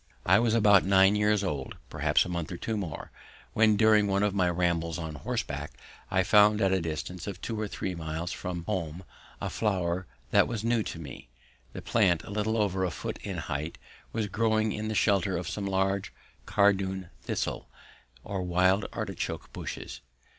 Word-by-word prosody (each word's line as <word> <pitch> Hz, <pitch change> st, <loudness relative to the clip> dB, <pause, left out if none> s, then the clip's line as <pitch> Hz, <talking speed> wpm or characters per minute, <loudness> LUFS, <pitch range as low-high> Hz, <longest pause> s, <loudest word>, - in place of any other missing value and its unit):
I 95 Hz, +3 st, +6 dB
was 115 Hz, -1 st, +2 dB
about 105 Hz, -4 st, +6 dB
nine 95 Hz, +1 st, +5 dB
years 105 Hz, -1 st, +2 dB
old, 75 Hz, -8 st, -3 dB, 0.2 s
perhaps -, -, +2 dB
a -, -, -6 dB
month 85 Hz, -3 st, -3 dB
or 85 Hz, -, -4 dB
two 110 Hz, +5 st, -3 dB
more, 95 Hz, -7 st, -5 dB, 0.4 s
when 110 Hz, -1 st, +4 dB
during 110 Hz, -1 st, +5 dB
one 100 Hz, 0 st, +1 dB
of 105 Hz, -1 st, +1 dB
my 90 Hz, -3 st, +2 dB
rambles 85 Hz, -2 st, 0 dB
on 80 Hz, -2 st, -5 dB
horseback 75 Hz, -, -4 dB, 0.4 s
I 95 Hz, 0 st, +2 dB
found 105 Hz, +2 st, +5 dB
at 95 Hz, -2 st, +3 dB
a 95 Hz, -1 st, +2 dB
distance 85 Hz, +3 st, -5 dB
of 95 Hz, -3 st, -5 dB
two 110 Hz, 0 st, -4 dB
or 105 Hz, -, -1 dB
three 95 Hz, -1 st, -4 dB
miles 80 Hz, +1 st, -4 dB
from 90 Hz, -2 st, -4 dB
home, 85 Hz, -3 st, -3 dB, 0.4 s
a -, -, -3 dB
flower 90 Hz, -4 st, -1 dB, 0.2 s
that -, -, +5 dB
was 115 Hz, -3 st, -4 dB
new 115 Hz, 0 st, +2 dB
to 95 Hz, -, -5 dB
me. 70 Hz, -7 st, -9 dB, 0.4 s
The -, -, -7 dB
plant, 95 Hz, -7 st, +2 dB
a -, -, -9 dB
little 105 Hz, +2 st, 0 dB
over 95 Hz, -3 st, +1 dB
a 90 Hz, -, +1 dB
foot 80 Hz, -, -5 dB
in -, -, -5 dB
height, 75 Hz, +4 st, -4 dB, 0.3 s
was 110 Hz, -1 st, -1 dB
growing 110 Hz, +1 st, +1 dB
in 105 Hz, +1 st, -3 dB
the 110 Hz, -, -2 dB
shelter 100 Hz, -3 st, +2 dB
of 85 Hz, -1 st, -4 dB
some 100 Hz, -1 st, -3 dB
large 95 Hz, +1 st, 0 dB, 0.4 s
cardoon 95 Hz, -2 st, +2 dB
thistle, -, -, -3 dB, 0.5 s
or 100 Hz, -2 st, -3 dB
wild 90 Hz, +3 st, +2 dB
artichoke, 105 Hz, -5 st, -4 dB
bushes. -, -, -6 dB
95 Hz, 180 wpm, -29 LUFS, 85-105 Hz, 0.5 s, I